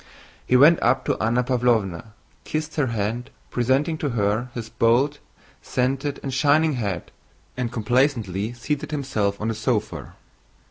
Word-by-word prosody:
He 125 - +5
went 155 +6 +6
up 130 +3 +2
to - - 0
Anna 120 +3 +2
Pávlovna, 115 -8 +1 0.4
kissed 155 0 -3
her 145 -4 +1
hand, 115 +2 -2 0.2
presenting 135 +6 +1
to 145 - -1
her 110 +1 0
his 115 -2 -5
bald, 125 +7 +2 0.4
scented, 135 +3 -1
and 135 - -3
shining 150 +3 +3
head, 100 -8 -3 0.4
and 125 -2 -2
complacently 115 -4 0
seated 140 +4 -3
himself 130 -9 -1
on 110 - -2
the - - 0
sofa. 105 - -2
125 Hz, 140 wpm, -23 LUFS, 110-140 Hz, 0.4 s, went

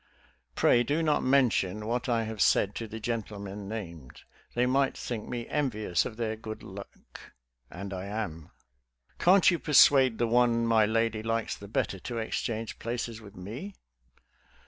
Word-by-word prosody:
Pray, 120 - +4
do 145 +7 0
not 155 -2 +2
mention 110 -7 +2
what 120 +3 -2
I 115 -1 +2
have 110 -1 -5
said 100 - +3
to 115 - -5
the 110 +1 -7
gentlemen 105 -3 -5
named. 85 - -8 0.3
They 120 +1 +3
might 135 +2 +1
think 115 -4 -5
me 120 -1 -4
envious 110 - 0
of 110 - -6
their 110 -2 -2
good 110 0 -8
luck, 100 +1 -12 0.3
and 100 +2 -7
I 95 0 -5
am. 95 -7 -5 0.7
Can't 185 +1 +6
you 170 - -1
persuade 135 -5 +5
the 120 - +1
one 115 0 +3
my 110 -2 +4
lady 115 0 0
likes 115 0 -1
the 100 - -11
'better 100 -2 -2
to 120 +6 -5
exchange 115 0 -3
places 115 -1 -4
with 100 -2 -13
me? 120 - -7
115 Hz, 160 wpm, -29 LUFS, 105-120 Hz, 0.7 s, Can't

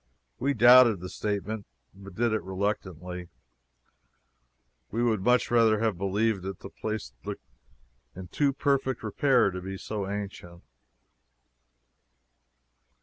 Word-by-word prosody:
We 140 +2 0
doubted 120 -2 +7
the 90 +1 -7
statement, 105 +1 -3 0.3
but 95 -1 -13
did 115 +1 +1
it 110 - 0
reluctantly. 90 -3 -4 1.6
We 115 +3 -1
would 110 -5 +1
much 125 +4 +2
rather 115 -2 +4
have 110 -2 0
believed 100 +2 0
it. 95 -1 -5
The - - -11
place 110 - -5
looked - - -7 0.7
in 95 0 -8
too 140 +7 +1
perfect 135 -3 0
repair 125 0 +2
to 90 0 -6
be 95 +1 -6
so 100 -1 -4
ancient. 100 -4 -7
105 Hz, 120 wpm, -27 LUFS, 95-115 Hz, 1.6 s, doubted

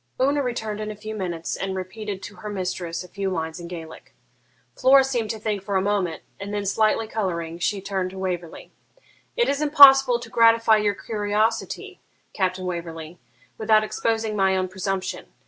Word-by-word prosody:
Una 280 +2 +2
returned 220 -5 -3
in 215 - -4
a 215 - -6
few 215 +1 -7
minutes, 175 -5 -3
and 190 0 -3
repeated 190 +1 -6
to 205 - -9
her 210 - -7
mistress 180 -3 -3
a - - -12
few 195 +1 -3
lines 160 -2 -3
in 170 - -8
Gaelic. 165 -2 -10 0.6
Flora 270 +1 +6
seemed 245 -5 -2
to 225 - -2
think 210 -2 -2
for 200 0 -4
a 190 - +3
moment, 195 -5 -1 0.2
and 200 +1 -6
then, 205 -1 -2
slightly 215 +2 +1
colouring, 170 -6 -3
she 195 +3 -1
turned 190 -1 -2
to 190 - -11
Waverley 180 -3 -5 0.7
'It 475 - +3
is 280 +1 0
impossible 270 -4 +8
to 235 - -9
gratify 230 -1 +5
your 205 -1 +1
curiosity, 215 +1 -2 0.3
Captain 185 -1 -1
Waverley, 170 -1 -6 0.4
without 215 0 +4
exposing 220 0 -1
my 190 -1 +2
own 185 0 0
presumption. 190 0 -4
205 Hz, 175 wpm, -24 LUFS, 185-220 Hz, 0.7 s, impossible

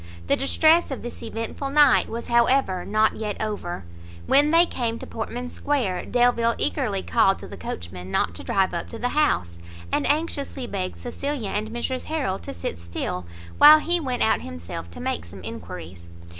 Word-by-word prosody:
The - - +3
distress 315 +5 +3
of 270 - -5
this 240 - -7
eventful 230 +4 -4
night 290 -1 +5
was 235 +1 -5
however 235 -6 +2
not 215 +1 +2
yet 210 -2 -4
over; 205 - -4 0.4
when 290 - +4
they 335 +2 +6
came 235 -8 -2
to - - -8
Portman 245 +2 -5
square, 250 -11 -1
Delvile 240 -1 +3
eagerly 95 0 0
called 85 -1 +3
to - - -10
the - - -9
coachman 90 +1 -7
not 85 - 0
to 85 - -8
drive 190 -2 +1
up 170 - -4
to 230 - -7
the 245 +2 -1
house, 90 - +1 0.3
and - - +1
anxiously 285 -3 -1
begged 190 -5 -4
Cecilia 250 -2 -4
and 215 +1 -2
Mrs 240 +2 -3
Harrel 280 -12 -2
to - - -7
sit 85 -1 -5
still, 85 +1 -4 0.3
while 300 +1 +10
he 345 +3 +1
went 255 -6 -1
out 220 - +2
himself 85 0 -7
to 85 - -11
make 80 - -2
some 90 +2 -12
enquiries. 90 -4 -8
225 Hz, 180 wpm, -24 LUFS, -, 0.4 s, while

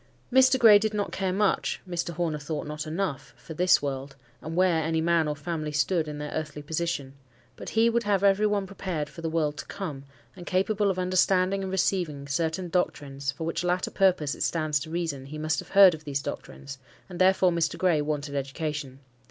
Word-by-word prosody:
Mr. 260 0 +6
Gray 220 -4 +8
did 215 0 -1
not 205 -1 -2
care 190 -1 -1
much,—Mr. 185 -3 -1
Horner 160 -2 -2
thought 150 +1 -4
not 150 +1 -5
enough,—for 160 -2 -5
this 180 -1 +3
world, 135 0 -4 0.3
and 160 +2 -6
where 180 -3 +3
any 160 +1 0
man 165 -1 +2
or 150 - -2
family 155 0 -4
stood 155 +2 +1
in 150 -1 -6
their 150 0 -5
earthly 150 -1 -5
position; 155 -3 -3 0.4
but - - -8
he 225 +1 +5
would 235 0 +2
have 205 -3 0
every 200 +1 +4
one 205 -1 0
prepared 180 -6 -4
for 165 - -11
the 165 - -2
world 155 -2 -1
to - - -6
come, 155 -9 -6 0.3
and 180 -2 -11
capable 200 +2 +1
of 190 - -1
understanding 185 +1 +2
and 190 -1 -4
receiving 175 -7 -1
certain 160 +5 -1
doctrines, 140 -6 -2
for 140 - -7
which 165 +2 -2
latter 180 +1 0
purpose, 180 -7 +2
it - - -10
stands 155 -3 0
to 155 +2 -7
reason, 160 -5 -3
he 155 +2 -7
must 155 0 -1
have - - -8
heard 195 -2 +8
of 155 -1 -8
these 140 -2 -3
doctrines; 140 -1 -7 0.3
and 180 -1 -6
therefore 185 -1 +4
Mr. 165 -3 0
Gray 175 -5 +2
wanted 145 -1 -3
education. 140 -1 -4
165 Hz, 200 wpm, -27 LUFS, 150-185 Hz, 0.4 s, Gray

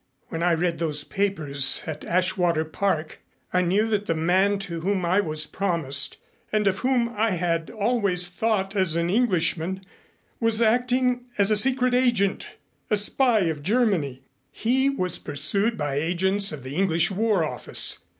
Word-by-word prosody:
When 165 - -4
I 175 -1 +3
read 170 0 -1
those 150 -3 0
papers 150 -10 0
at 155 -1 -6
Ashwater 175 -2 +1
Park 160 -1 -2 0.3
I 180 - +3
knew 195 +5 +1
that 210 -1 -1
the 165 - 0
man 185 +5 +2
to 180 -4 -5
whom 190 0 -1
I 185 +4 +2
was 155 -5 -1
promised 165 -8 -1 0.3
and 215 -1 +1
of 195 -1 +1
whom 250 -2 +1
I 220 0 +1
had 170 -2 -1
always 200 -5 0
thought 195 +1 -1
as 185 -5 +2
an 170 +1 0
Englishman 190 -4 0 0.5
was 225 -1 +1
acting 245 +2 +1
as 200 +1 +3
a - - +4
secret 255 +3 +2
agent 235 -6 +1 0.4
a 210 - +3
spy 225 +2 +2
of 160 -4 -1
Germany. 175 - 0 0.3
He 265 +4 +1
was 185 -10 -2
pursued 195 +11 -1
by 145 -2 -2
agents 190 +5 +2
of 150 -4 -8
the 135 +4 -6
English 170 -3 +2
War 205 -2 +1
Office. - - -1
190 Hz, 160 wpm, -24 LUFS, 165-215 Hz, 0.5 s, a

